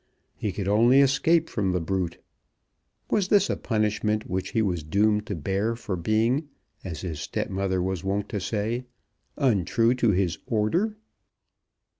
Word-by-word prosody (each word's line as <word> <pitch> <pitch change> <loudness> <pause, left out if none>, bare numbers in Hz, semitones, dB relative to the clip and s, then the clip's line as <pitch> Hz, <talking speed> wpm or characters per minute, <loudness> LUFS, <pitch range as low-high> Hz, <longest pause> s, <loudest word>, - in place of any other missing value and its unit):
He 105 - -2
could 100 0 -4
only 115 +6 +5
escape 155 +5 +3
from 95 -4 -1
the 90 - +1
brute. 90 0 -2 0.9
Was 200 -3 +2
this 205 -1 +3
a - - 0
punishment 105 -1 -1
which 95 0 -2
he 115 - +1
was 90 -5 -1
doomed 105 +7 +1
to 100 - -3
bear 95 +8 -1
for 110 -4 -4
being 115 - +1 0.3
as 85 -5 -6
his 85 -5 -5
stepmother 95 +3 -2
was 95 -1 -2
wont 100 +1 -1
to 105 - -2
say 110 +5 -2 0.5
untrue 115 - +2
to 125 -2 +2
his 95 -3 +1
order? 170 - 0
105 Hz, 150 wpm, -26 LUFS, 95-120 Hz, 0.9 s, only